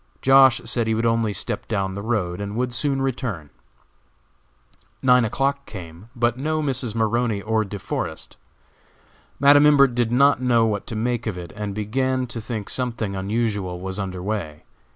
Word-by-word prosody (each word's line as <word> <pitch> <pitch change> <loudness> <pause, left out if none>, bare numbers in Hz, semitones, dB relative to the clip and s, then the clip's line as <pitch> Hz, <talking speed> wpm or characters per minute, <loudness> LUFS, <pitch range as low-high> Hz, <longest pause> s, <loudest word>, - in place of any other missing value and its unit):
Josh. 135 -2 +6
said 115 -2 0
he 110 - +1
would 115 +1 0
only 115 -2 +1
step 100 - -3
down 95 -1 -1
the 100 - -5
road, 100 -5 -2
and 100 +1 -5
would 125 +1 -1
soon 135 +2 0
return. 115 - -3 1.5
Nine 125 -1 +5
o'clock 140 +4 -1
came, 90 +1 -10
but 120 +1 0
no 155 +3 -1
Mrs. 130 -6 -2
Maroney 115 -1 +1
or 110 0 +1
De 100 0 -6
Forest. - - -5 1.0
Madam 145 +1 +7
Imbert 140 -3 +5
did 120 -1 0
not 140 +1 +4
know 120 -3 +3
what 105 -3 -2
to 115 - -5
make 115 +1 -1
of 100 -4 -3
it, 85 -1 -8
and 105 -2 -4
began 130 +5 -1
to 120 -1 -6
think 110 -2 -5
something 115 -6 -3
unusual 100 -2 -2
was 95 +2 -5
under 95 -2 -4
way. 95 -8 -4
115 Hz, 170 wpm, -23 LUFS, 100-125 Hz, 1.5 s, Madam